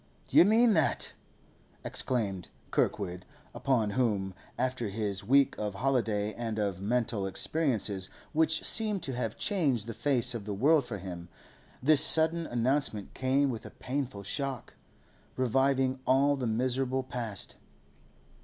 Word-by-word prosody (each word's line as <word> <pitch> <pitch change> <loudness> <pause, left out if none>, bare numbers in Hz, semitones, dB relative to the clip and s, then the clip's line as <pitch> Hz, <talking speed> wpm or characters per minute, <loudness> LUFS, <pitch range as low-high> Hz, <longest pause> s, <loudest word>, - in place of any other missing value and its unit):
'You - - +7
mean 225 +2 +5
that?' 160 -5 +1 0.7
exclaimed 100 -8 -1 0.2
Kirkwood, 90 -3 -1 0.3
upon 120 -7 0
whom, 100 -5 0 0.2
after 125 -3 -1
his 100 -1 -3
week 135 +6 +3
of 105 -2 -3
holiday 110 -4 0
and 115 -2 -4
of 100 -3 -2
mental 110 -2 -1
experiences 105 - -1 0.2
which 160 0 +2
seemed 210 -2 +1
to 135 - -3
have 120 -3 -3
changed 140 - 0
the 115 - -5
face 130 -1 +1
of 115 -4 -6
the 105 -1 -3
world 145 +6 +3
for 115 -4 -5
him, 90 -2 -8 0.5
this 150 +1 +5
sudden 165 +1 +4
announcement 120 -3 0
came 135 +1 +1
with 115 - -6
a - - -9
painful 130 -6 -4
shock, 135 +7 -4 0.6
reviving 130 +1 +1
all 140 +2 +4
the 130 -3 -3
miserable 130 +3 0
past. 120 -6 -4
125 Hz, 135 wpm, -30 LUFS, 105-140 Hz, 0.7 s, You